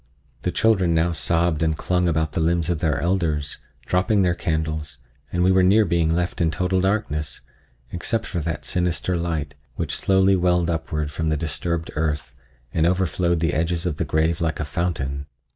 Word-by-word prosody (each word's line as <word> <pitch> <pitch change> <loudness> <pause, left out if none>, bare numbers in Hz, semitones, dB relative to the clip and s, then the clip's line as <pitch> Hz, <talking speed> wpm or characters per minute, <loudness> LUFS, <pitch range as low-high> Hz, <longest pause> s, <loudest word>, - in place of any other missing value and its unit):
The - - -1
children 95 -7 +2
now 80 +2 +2
sobbed 85 0 +1
and 80 -1 +1
clung 90 +1 +1
about 80 -2 +1
the 75 - -2
limbs 85 +1 +1
of 85 - -1
their 75 -3 +1
elders, 80 -4 -1 0.3
dropping 95 +2 +2
their 90 -1 +3
candles, 80 -3 -2 0.3
and 90 0 +1
we 95 - +4
were 95 0 +5
near 100 +4 +5
being 85 -2 +1
left 85 +2 -1
in 85 - +3
total 90 +4 0
darkness, 75 -8 -1 0.5
except 110 +6 -1
for 90 - -3
that 80 -2 -3
sinister 90 -1 0
light, 80 -4 -2 0.2
which - - -2
slowly 95 0 +3
welled 90 -2 +2
upward 75 -2 -2
from 80 +2 -2
the 80 - +1
disturbed 80 +1 -3
earth 75 -2 -2 0.4
and 80 0 +3
overflowed 85 -2 +1
the 80 - +1
edges 85 +2 0
of 85 -5 -1
the - - 0
grave 80 +2 0
like 80 -1 -1
a 75 - -1
fountain. 70 -4 -2
85 Hz, 180 wpm, -23 LUFS, 80-90 Hz, 0.5 s, were